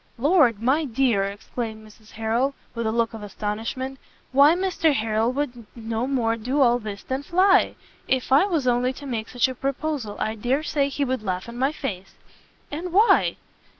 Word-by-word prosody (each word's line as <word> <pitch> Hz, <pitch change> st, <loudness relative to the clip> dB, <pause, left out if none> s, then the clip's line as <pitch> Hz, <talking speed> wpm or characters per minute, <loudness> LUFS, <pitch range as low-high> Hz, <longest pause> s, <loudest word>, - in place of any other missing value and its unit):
"Lord, 275 Hz, -, +4 dB
my 265 Hz, +8 st, +2 dB
dear!" 240 Hz, -6 st, +1 dB
exclaimed 220 Hz, +2 st, -6 dB
Mrs 215 Hz, 0 st, -18 dB
Harrel, 230 Hz, +5 st, 0 dB, 0.2 s
with 235 Hz, -1 st, -2 dB
a -, -, +1 dB
look 230 Hz, 0 st, 0 dB
of 225 Hz, -, -7 dB
astonishment, 220 Hz, +6 st, -4 dB, 0.3 s
"why 285 Hz, +5 st, +6 dB
Mr 355 Hz, -5 st, +1 dB
Harrel 220 Hz, +1 st, +1 dB
would 250 Hz, -5 st, -4 dB
no 230 Hz, +1 st, -3 dB
more 235 Hz, -4 st, +1 dB
do 250 Hz, +6 st, -2 dB
all 245 Hz, -3 st, +4 dB
this 210 Hz, -3 st, -7 dB
than 260 Hz, +1 st, -3 dB
fly! 375 Hz, +6 st, +3 dB, 0.3 s
If 260 Hz, -1 st, 0 dB
I 280 Hz, +8 st, +6 dB
was 325 Hz, -9 st, 0 dB
only 250 Hz, +1 st, +2 dB
to 285 Hz, -, -10 dB
make 230 Hz, -4 st, -4 dB
such 245 Hz, +1 st, +2 dB
a 260 Hz, -, -4 dB
proposal, 275 Hz, -4 st, -3 dB
I 220 Hz, -, -1 dB
dare 245 Hz, +7 st, -1 dB
say 285 Hz, -2 st, 0 dB
he 280 Hz, 0 st, -1 dB
would 260 Hz, -2 st, -2 dB
laugh 185 Hz, -2 st, -3 dB
in 235 Hz, -, -8 dB
my 265 Hz, +3 st, +1 dB
face." 200 Hz, -11 st, -6 dB, 0.6 s
"And 335 Hz, +4 st, -4 dB
why?" 415 Hz, +6 st, +4 dB
250 Hz, 185 wpm, -24 LUFS, 220-280 Hz, 0.6 s, why